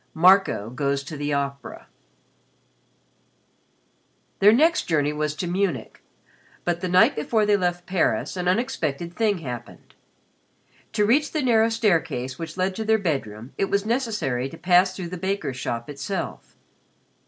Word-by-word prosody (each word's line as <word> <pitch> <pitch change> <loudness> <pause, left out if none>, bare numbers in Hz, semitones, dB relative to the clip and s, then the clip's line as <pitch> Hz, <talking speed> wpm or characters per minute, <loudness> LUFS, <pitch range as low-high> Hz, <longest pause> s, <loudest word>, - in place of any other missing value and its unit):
XX - - -40
MARCO 180 - +4
GOES 140 +1 -1
TO 155 +3 -8
THE 145 0 -3
OPERA 140 0 -4 2.5
Their 205 +2 +7
next 320 +9 +3
journey 150 -3 +1
was 150 0 -2
to 180 - -3
Munich, 175 - -2 0.6
but 175 0 -1
the 185 - -2
night 180 +1 +5
before 215 +8 +1
they 205 0 +4
left 175 -2 -1
Paris 185 0 0
an 180 -1 -3
unexpected 175 - -1
thing 210 0 +1
happened. 120 -2 -8 1.0
To 210 - +2
reach 285 +7 +2
the 310 -3 0
narrow 225 -3 +4
staircase 160 - 0
which 165 +1 -6
led 185 +1 0
to 220 - -2
their 220 0 +3
bedroom 135 - -3
it - - +3
was 200 +1 0
necessary 210 - -1
to 165 - -11
pass 180 +1 +3
through 180 -3 -5
the 180 - -6
baker's 190 -7 -2
shop 115 -2 -4
itself. 145 +7 -5
180 Hz, 150 wpm, -24 LUFS, 145-205 Hz, 2.5 s, Their